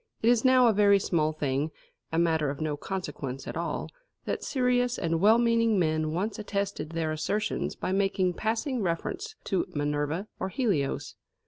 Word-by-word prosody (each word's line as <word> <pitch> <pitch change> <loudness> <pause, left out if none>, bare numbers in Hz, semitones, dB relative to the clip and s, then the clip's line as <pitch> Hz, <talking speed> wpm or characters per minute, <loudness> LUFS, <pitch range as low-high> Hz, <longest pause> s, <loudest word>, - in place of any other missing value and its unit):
It 230 - +5
is 240 -2 +4
now 255 -1 +6
a 230 - +5
very 200 0 +5
small 160 -5 +1
thing 145 -1 -1 0.4
a 160 - -1
matter 160 -3 +2
of 140 - -5
no 155 -2 -1
consequence 145 -6 -5
at - - -5
all - - -2 0.4
that - - -2
serious 250 -2 +1
and 165 -1 0
well 215 +3 +6
meaning 230 -2 +3
men 155 -3 +1
once 195 +8 -2
attested 200 -5 -3
their 160 -1 -1
assertions 200 +7 -1
by - - -3
making 195 -1 +1
passing 230 - -1
reference 365 - -3
to 190 0 0
Minerva 145 +5 -1
or 190 - -2
Helios. 190 - -1
190 Hz, 165 wpm, -28 LUFS, 155-225 Hz, 0.4 s, now